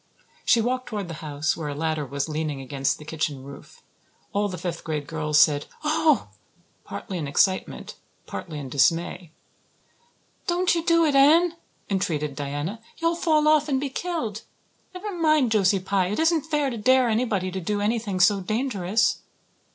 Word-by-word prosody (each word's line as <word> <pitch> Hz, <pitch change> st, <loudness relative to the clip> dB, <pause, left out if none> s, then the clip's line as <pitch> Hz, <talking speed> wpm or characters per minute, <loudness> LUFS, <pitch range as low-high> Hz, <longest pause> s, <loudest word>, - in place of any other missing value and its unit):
She 235 Hz, -, +4 dB
walked 255 Hz, +2 st, -1 dB
toward 205 Hz, -5 st, -4 dB
the -, -, -5 dB
house, 150 Hz, 0 st, -1 dB
where 160 Hz, -2 st, -5 dB
a 145 Hz, -, -4 dB
ladder 155 Hz, -1 st, -2 dB
was 140 Hz, +2 st, -2 dB
leaning 155 Hz, -2 st, -3 dB
against 135 Hz, 0 st, -1 dB
the 150 Hz, -, -12 dB
kitchen 150 Hz, -3 st, -3 dB
roof. 140 Hz, +1 st, -13 dB, 0.5 s
All 205 Hz, +1 st, +1 dB
the 180 Hz, -, -5 dB
fifth 175 Hz, 0 st, -4 dB
class 155 Hz, -3 st, -3 dB
girls 150 Hz, -1 st, +1 dB
said, 145 Hz, -2 st, +4 dB, 0.2 s
"Oh!" 310 Hz, -1 st, +2 dB, 0.5 s
partly 185 Hz, -3 st, -6 dB
in 150 Hz, -, -3 dB
excitement, 185 Hz, +7 st, 0 dB, 0.3 s
partly 160 Hz, -4 st, -6 dB
in 140 Hz, -2 st, -6 dB
dismay. 165 Hz, +5 st, +1 dB, 1.2 s
"Don't 360 Hz, +1 st, +2 dB
you 335 Hz, -1 st, -1 dB
do 335 Hz, -1 st, +4 dB
it, 295 Hz, -, +2 dB
Anne," 320 Hz, +5 st, +5 dB, 0.3 s
entreated 155 Hz, -7 st, -1 dB
Diana. 145 Hz, +9 st, -4 dB, 0.2 s
"You'll 330 Hz, 0 st, +1 dB
fall 310 Hz, -3 st, +2 dB
off 305 Hz, -1 st, +4 dB
and 265 Hz, -2 st, +1 dB
be 275 Hz, -1 st, -3 dB
killed. 300 Hz, -, -3 dB, 0.5 s
Never 395 Hz, +1 st, -5 dB
mind 310 Hz, -7 st, +3 dB
Josie 195 Hz, -2 st, +3 dB
Pye. 190 Hz, 0 st, 0 dB
It 210 Hz, -, -2 dB
isn't 320 Hz, -1 st, +2 dB
fair 295 Hz, -3 st, 0 dB
to 235 Hz, -, -5 dB
dare 255 Hz, +3 st, +4 dB
anybody 215 Hz, -5 st, 0 dB
to 190 Hz, +1 st, -4 dB
do 205 Hz, +4 st, -1 dB
anything 210 Hz, -2 st, -1 dB
so 200 Hz, +2 st, +5 dB
dangerous." 215 Hz, 0 st, 0 dB
200 Hz, 165 wpm, -25 LUFS, -, 1.2 s, Anne